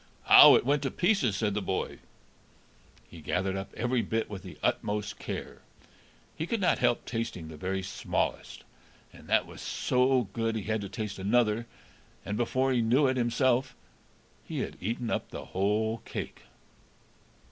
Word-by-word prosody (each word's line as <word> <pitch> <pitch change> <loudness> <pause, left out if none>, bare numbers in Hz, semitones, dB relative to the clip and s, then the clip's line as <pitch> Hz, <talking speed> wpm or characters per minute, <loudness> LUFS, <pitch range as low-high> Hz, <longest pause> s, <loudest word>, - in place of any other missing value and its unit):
"Ow, - - +11
it - - +2
went 145 +1 +2
to 135 - -1
pieces," 175 - +1
said 105 0 0
the 105 - -1
boy. 95 0 -3 1.1
He 85 - -12
gathered 95 +5 -1
up 95 0 -5
every 120 +1 +1
bit 110 -1 -2
with 95 -2 -6
the 90 -5 -11
utmost 105 0 -1
care; - - -6 0.7
he 160 - -4
could 230 - -1
not 185 - +2
help 120 - +1
tasting 115 -9 -4
the 80 - -9
very 95 +4 -3
smallest, 95 - -3 0.5
and - - -15
that - - +3
was - - -11
so 125 0 +2
good 115 -1 -1
he 110 - -3
had 110 0 -1
to 100 - -6
taste 105 0 -5
another, 110 +2 +1 0.6
and, 100 - -3
before 130 +3 +1
he 125 -2 +2
knew 125 +6 +3
it 130 0 +2
himself, 125 +2 +1 0.7
he - - -4
had - - -5
eaten 115 +4 -2
up - - -2
the - - -7
whole 110 +4 0
cake. - - -7
115 Hz, 165 wpm, -29 LUFS, 100-125 Hz, 1.1 s, Ow